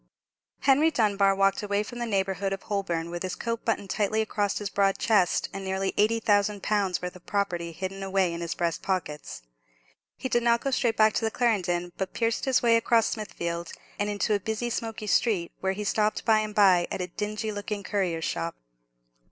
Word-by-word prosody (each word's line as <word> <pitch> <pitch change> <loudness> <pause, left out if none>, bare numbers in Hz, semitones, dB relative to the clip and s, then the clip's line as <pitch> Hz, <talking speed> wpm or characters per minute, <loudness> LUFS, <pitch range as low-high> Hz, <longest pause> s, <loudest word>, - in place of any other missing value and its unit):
Henry 285 +4 +5
Dunbar 200 -7 +2
walked 195 0 +2
away 205 0 0
from 240 +2 -8
the 240 - -2
neighbourhood 195 -1 0
of 195 - -6
Holborn 175 -5 -2
with 175 0 -5
his 185 -1 -3
coat 230 -1 -3
buttoned 205 -4 -1
tightly 215 +1 0
across 205 -2 -1
his 205 -2 -4
broad 195 -1 +2
chest, 200 -6 +2
and 195 0 -5
nearly 190 0 -1
eighty 220 +2 +3
thousand 205 -2 +1
pounds' 200 -4 0
worth 180 0 -4
of 180 - -15
property 175 -4 -1
hidden 190 +3 -5
away 190 -2 +1
in 170 - -5
his 170 0 -3
breast 170 -2 -1
pockets. 150 - -3 0.7
He - - -3
did 240 -1 +2
not 235 0 +3
go 275 - -1
straight 235 -3 +1
back 215 0 +5
to - - -1
the - - +2
Clarendon, 180 -7 0
but 190 -1 -3
pierced 230 -1 0
his 265 -2 +2
way 230 -1 +5
across 230 0 +3
Smithfield, 170 -6 -4 0.3
and 205 0 0
into 205 +1 0
a 205 - +2
busy 220 +4 -3
smoky 225 -1 -4
street, 205 -4 +1
where 190 0 0
he 210 +2 -4
stopped 210 +1 0
by 220 -1 +5
and 215 -1 -4
by 185 -4 +5
at - - -4
a 180 - -1
dingy 210 +4 -4
looking 205 0 -4
currier's 180 -5 -1
shop. 85 0 -2
200 Hz, 200 wpm, -27 LUFS, 185-220 Hz, 0.7 s, Henry